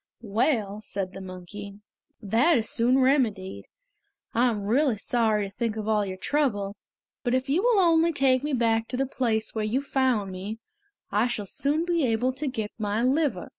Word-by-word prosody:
"Well," 215 -2 0
said 195 -3 -4
the 195 - -8
monkey, 190 +2 -9 0.5
"that 240 - +3
is 225 - -1
soon 250 +3 +2
remedied. 225 -9 0 0.7
I 245 +2 +3
am 210 -3 -3
really 245 +3 +2
sorry 220 -2 +1
to 195 - -15
think 230 -2 -2
of 215 -1 -4
all 215 -1 +2
your 185 0 -5
trouble; 205 -5 -1 0.5
but 245 -1 +1
if 260 +1 -1
you 315 +7 +2
will 475 -1 +3
only 335 -2 +4
take 265 -4 +3
me 295 -1 -2
back 225 -2 +1
to 250 - -4
the 270 - +1
place 230 -4 -1
where 220 - -2
you 220 +5 0
found 260 -8 0
me, 195 +4 -6 0.5
I - - +2
shall 220 -4 -3
soon 290 - 0
be 340 -3 +1
able 245 +1 +1
to 285 +3 -4
get 220 -5 -3
my 210 +2 -1
liver." 265 - +1
230 Hz, 185 wpm, -26 LUFS, 210-270 Hz, 0.7 s, only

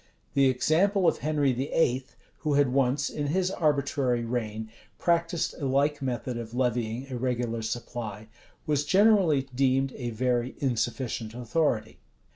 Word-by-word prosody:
The 140 -1 +4
example 175 +9 +2
of - - +2
Henry 145 -3 +1
VIII., 130 0 +1 0.3
who 150 -2 0
had 140 -3 +3
once, 135 +1 +2
in 145 -1 -3
his 185 +4 +1
arbitrary 140 -7 +1
reign, 110 -2 -3 0.3
practiced 170 -1 +1
a 140 - 0
like 140 +2 +1
method 125 -2 -3
of 115 0 -7
levying 120 -1 -1
a 125 - -3
regular 120 -2 -1
supply, 110 -2 -5 0.4
was 145 -2 +1
generally 190 -4 +4
deemed 135 +1 +2
a 120 -3 -4
very 120 +1 -1
insufficient 120 -3 -2
authority. 125 0 -1
130 Hz, 135 wpm, -27 LUFS, 120-150 Hz, 0.4 s, The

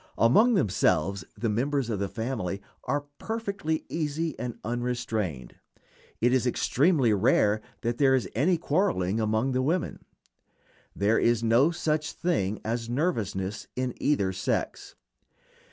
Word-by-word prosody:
Among 215 - +5
themselves 100 - +1
the 115 - -1
members 125 +3 0
of 105 - -2
the 100 - -1
family 110 -5 -3 0.3
are 145 +1 0 0.2
perfectly 200 -8 -3
easy 160 0 -2
and 120 0 -4
unrestrained. 115 - -3 0.6
It 120 +2 +3
is 130 -1 +2
extremely 135 -1 +2
rare 105 0 +3 0.2
that 120 0 -2
there 135 -2 +5
is 120 -8 0
any 165 - +2
quarreling 145 - 0
among 110 +4 +1
the 130 0 +1
women. 165 +6 -1 0.9
There 105 +3 +2
is 120 -1 +2
no 115 +7 +4
such 155 -2 -1
thing 110 - -1
as 115 +1 -2
nervousness 105 - -2
in 130 -1 -2
either 100 -11 +1
sex. 95 - -3
120 Hz, 130 wpm, -27 LUFS, 110-150 Hz, 0.9 s, Among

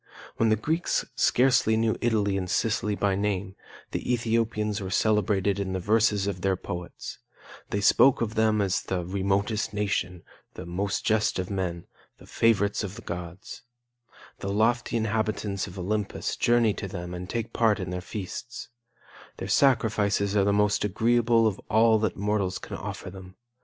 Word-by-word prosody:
When 115 - +3
the 110 - +4
Greeks 160 - -1
scarcely 125 -3 +3
knew 110 0 +1
Italy 105 -4 +1
and 95 -2 -2
Sicily 105 +1 0
by 100 -1 +1
name, 100 -1 -2 0.4
the - - -2
Ethiopians 115 -3 0
were 95 - -4
celebrated 100 -1 +1
in 95 -1 -2
the 95 - -1
verses 105 0 +2
of 100 -3 -3
their 95 0 +1
poets; 90 -1 -7 0.5
they 100 - -1
spoke 130 +5 +5
of 110 -2 -2
them 110 -1 +2
as 95 -2 0
the 90 -2 -3
'remotest 100 +3 -1
nation,' 90 -4 -2 0.3
the - - -7
'most 95 +3 -2
just 110 -1 +2
of 95 +1 -3
men,' 90 -3 -3 0.3
the - - -16
'favorites 105 -2 +1
of 100 0 -5
the 115 - -10
gods,' 90 +2 -7 0.8
The 100 - -3
lofty 115 +3 +1
inhabitants 110 -2 -1
of 90 - -10
Olympus 100 +2 -2
journey 120 -3 +3
to 100 - -4
them 90 -2 -6
and 90 +1 -6
take 115 -1 -3
part 110 -3 +2
in - - -4
their 90 0 -3
feasts; 120 +9 -7 0.7
their - - -5
sacrifices 105 -6 +2
are 100 - +4
the 100 - +2
most 105 0 +2
agreeable 115 +3 +2
of 105 -4 0
all 110 0 +4
that 105 -3 -1
mortals 100 -2 0
can - - -8
offer 90 - -6
them. 95 -1 -12
105 Hz, 165 wpm, -26 LUFS, 95-110 Hz, 0.8 s, spoke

